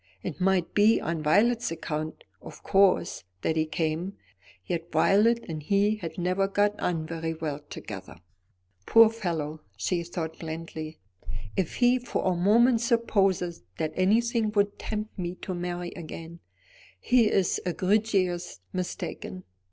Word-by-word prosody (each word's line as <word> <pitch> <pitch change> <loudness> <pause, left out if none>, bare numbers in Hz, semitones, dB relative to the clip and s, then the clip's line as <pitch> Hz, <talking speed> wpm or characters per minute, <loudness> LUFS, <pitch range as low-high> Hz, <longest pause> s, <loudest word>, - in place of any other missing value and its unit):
It - - -5
might 185 -2 +2
be 210 +2 +5
on 165 -1 -2
Violet's 225 +10 +3
account, 155 -1 -4 0.2
of - - -11
course, 195 - +3 0.2
that 160 - +1
he 155 -1 +1
came; 160 +4 -2 0.5
yet 170 -1 -3
Violet 230 +4 +4
and 155 -2 -5
he 205 +6 +2
had 165 -5 -7
never 185 +2 +1
got 205 +1 +1
on 165 -3 -1
very 165 0 -3
well 155 -3 -3
together. - - -8 0.7
"Poor 225 -1 +8
fellow!" 160 -8 -3 0.2
she 170 - 0
thought 165 -1 -5
blandly, 160 -1 -6 0.6
"if 185 -4 -1
he 245 +1 +4
for 245 - -3
a 185 -1 +2
moment 230 +6 +4
supposes 195 -7 +1 0.2
that 155 -1 -2
anything 225 +4 +2
would 200 0 +1
tempt 215 -1 -5
me 175 0 -3
to 185 - -5
marry 175 0 -4
again, 165 0 -8 0.6
he 235 - +4
is 190 -3 +1
egregiously 185 - 0
mistaken." 175 - -5
180 Hz, 135 wpm, -27 LUFS, 165-210 Hz, 0.7 s, Poor